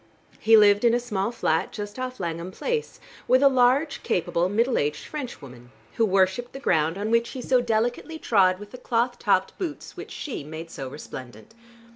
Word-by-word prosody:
He 225 0 +6
lived 205 0 +5
in 235 0 +5
a - - +2
small 215 -3 -2
flat 160 -8 0
just 205 +3 -7
off 255 0 -5
Langham 170 0 -4
Place, 460 - -3 0.3
with 255 +2 +4
a - - +8
large, 265 +3 +3
capable, 175 0 0
middle 230 +5 +1
aged 150 +1 -2
Frenchwoman, 140 - -8 0.3
who 225 - +4
worshiped 190 +5 +1
the 270 - -7
ground 160 - +1
on 210 +2 -2
which 230 0 +2
he - - -4
so 255 0 +3
delicately 240 +7 -1
trod 190 -10 +3
with 205 +1 -11
the 250 - -10
cloth 245 0 0
topped 190 -2 +1
boots 330 -6 -5
which - - -8
she 275 - -6
made 160 +2 -8
so 135 -2 -6
resplendent. 130 - -10
220 Hz, 185 wpm, -25 LUFS, 185-250 Hz, 0.3 s, a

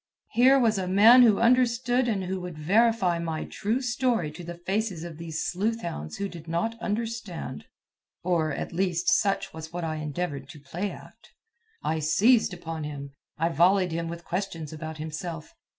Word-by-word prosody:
Here 260 +3 +6
was 225 -6 +2
a 185 - -2
man 215 +7 +7
who 220 -5 +6
understood 245 +1 +3
and 205 -5 0
who 185 0 -3
would 180 -3 -7
verify 195 +1 +2
my 165 -2 -3
true 220 +5 -2
story 240 -9 0
to 175 +3 -10
the 175 +1 -7
faces 190 -1 -2
of 170 -2 -8
those 165 -1 -4
sleuth 220 +5 -1
hounds 75 - -5
who 200 - -2
did 170 -4 -11
not 170 +8 -1
understand, 220 - -4 0.6
or, 170 -3 +1
at - - -4
least, 180 -1 +1
such 195 -2 +1
was 160 0 -8
what 175 0 -4
I 160 -1 -2
endeavored 150 -2 -4
to 160 -4 -11
play 175 +8 -4
act. - - -13 0.5
I 160 - 0
seized 210 - +4
upon 165 -3 -6
him; 140 -2 -6 0.3
I 165 +2 +1
volleyed 180 +3 +3
him 165 +1 -2
with 170 0 -7
questions 170 -4 -4
about 160 0 -6
himself. 160 +1 -6
175 Hz, 175 wpm, -27 LUFS, 160-220 Hz, 0.6 s, man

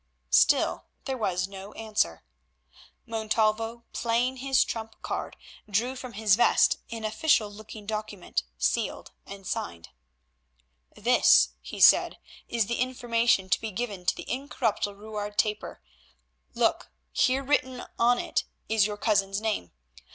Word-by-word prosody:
Still - - +3 0.2
there 265 - -2
was 185 -6 -1
no 195 +1 -10
answer. 210 - -1 0.8
Montalvo, 225 +1 0
playing 240 +3 0
his 270 +1 +3
trump 225 -1 -6
card, - - -4 0.3
drew 235 +6 0
from 255 -2 -8
his 210 -2 +3
vest 240 - +4
an 225 -1 -6
official 215 -1 +2
looking 215 0 -11
document, 210 - -3 0.2
sealed 60 - -1 0.2
and 195 -1 -10
signed. 85 - -4 1.1
"This," - - +5
he 65 - -8
said, - - +6 0.3
"is 230 -3 +1
the 235 +4 -3
information 235 -5 +1
to - - +3
be 225 - -3
given 200 -4 -5
to - - +3
the - - -9
incorruptible 245 -6 -2
Ruard 210 -1 -6
Trapper. 210 - -1 0.7
Look, - - +1 0.2
here 260 - +2
written 260 -2 0
on 245 +1 +4
it - - -1 0.2
is 220 -2 +3
your 210 -1 -5
cousin's 200 -2 +1
name. 215 - -2
220 Hz, 130 wpm, -27 LUFS, 205-235 Hz, 1.1 s, said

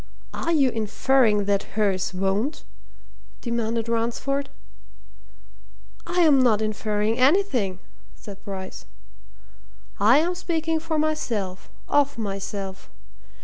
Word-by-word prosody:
"Are 335 - -2
you 280 -6 +3
inferring 220 -1 +2
that 200 +1 -1
hers 195 -4 +1
won't?" 195 - -1 0.8
demanded 230 -1 -2
Ransford. 240 +5 -1 1.6
"I'm 335 -6 +4
not 230 -5 +4
inferring 215 +1 -1
anything," 260 - +2 0.4
said 200 -2 -11
Bryce. 190 - -7 1.1
"I 225 +6 +6
am 340 +4 +2
speaking 325 -2 -1
for 320 0 -2
myself, 235 -12 -2 0.2
of 285 -2 +2
myself. 195 -2 -5
230 Hz, 95 wpm, -24 LUFS, 205-285 Hz, 1.6 s, I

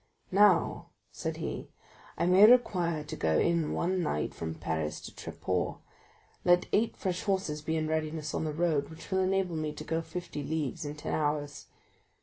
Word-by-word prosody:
"Now," 195 -3 +4 0.2
said - - -4
he, - - -4 0.5
"I - - +1
may 190 +4 +8
require 175 -10 +3
to 150 - -6
go 80 -1 +1
in 170 -2 +2
one 185 +1 0
night 115 - -1
from 80 0 -5
Paris 80 -1 -2
to - - -8
Tréport; - - -3 0.7
let 175 0 +4
eight 225 +2 +2
fresh 185 -2 -2
horses 190 -7 -1
be 160 +1 -2
in 155 0 -1
readiness 155 -1 -2
on - - -1
the 155 - -1
road, 155 -2 0
which 160 +4 -11
will 190 - +2
enable 190 -2 +1
me 155 -1 -2
to - - -7
go 165 0 -1
fifty 175 -2 -6
leagues 150 -1 -2
in 145 0 -4
ten 150 - -4
hours." 145 -1 -1
160 Hz, 175 wpm, -30 LUFS, 150-180 Hz, 0.7 s, may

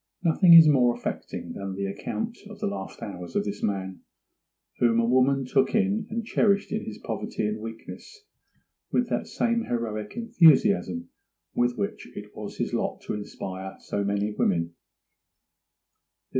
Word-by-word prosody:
Nothing 170 +1 +7
is 165 -1 +10
more 125 -5 +4
affecting - - -5
than 100 -1 -5
the 100 +1 -2
account 225 - -4
of 215 - -10
the - - -2
last 100 -1 -5
hours 90 -4 -7
of - - +2
this 105 0 -4
man, 95 -2 -2 0.8
whom 115 -1 +3
a 115 - +3
woman 130 +2 +3
took 135 - +2
in 210 0 +1
and 230 0 -3
cherished 200 -3 +2
in 215 +1 -2
his 110 - -7
poverty - - -4
and 105 +1 -2
weakness 115 - -9 0.7
with 245 -1 +1
that - - -1
same 235 -1 0
heroic 110 -3 -3
enthusiasm 165 - +4 0.4
with 120 0 +1
which 100 -2 -3
it - - -9
was - - -7
his - - -2
lot - - -2
to - - -4
inspire 95 -2 -6
so 100 - -3
many 100 +1 0
women. 85 -5 0
115 Hz, 155 wpm, -26 LUFS, -, 0.8 s, is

